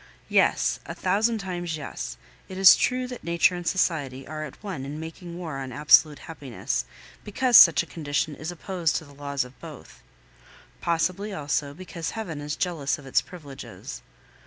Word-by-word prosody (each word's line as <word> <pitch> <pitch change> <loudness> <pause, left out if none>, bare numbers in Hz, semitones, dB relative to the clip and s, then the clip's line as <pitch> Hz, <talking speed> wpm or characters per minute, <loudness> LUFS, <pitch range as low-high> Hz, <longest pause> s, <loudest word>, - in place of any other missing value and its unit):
Yes, - - +3
a - - -6
thousand 215 +5 +1
times, 175 -5 -4
yes, 60 - -6 0.3
it 185 - -7
is 190 -1 +9
true 255 0 0
that 250 -1 -8
nature 170 +1 +3
and 175 -1 -6
society 140 -8 0
are 155 0 -5
at 150 - -12
one 190 -10 -5
in 145 +3 -6
making 170 +2 -8
war 160 -6 -5
on 130 -1 -6
absolute 150 +2 +5
happiness, 130 - -3 0.4
because 245 +4 +1
such 165 -6 +9
a - - -10
condition 150 -2 -2
is 155 +4 -5
opposed 175 -1 -1
to 160 - -2
the 145 - -15
laws 140 -1 -2
of 125 +1 -16
both; - - -12 0.8
possibly, 185 +5 0
also, 145 -2 -2
because 170 -1 -6
Heaven 165 -9 -5
is 145 0 -3
jealous 165 -6 -1
of 145 - -13
its 135 - +2
privileges. 145 -7 -10
160 Hz, 170 wpm, -26 LUFS, 145-185 Hz, 0.8 s, is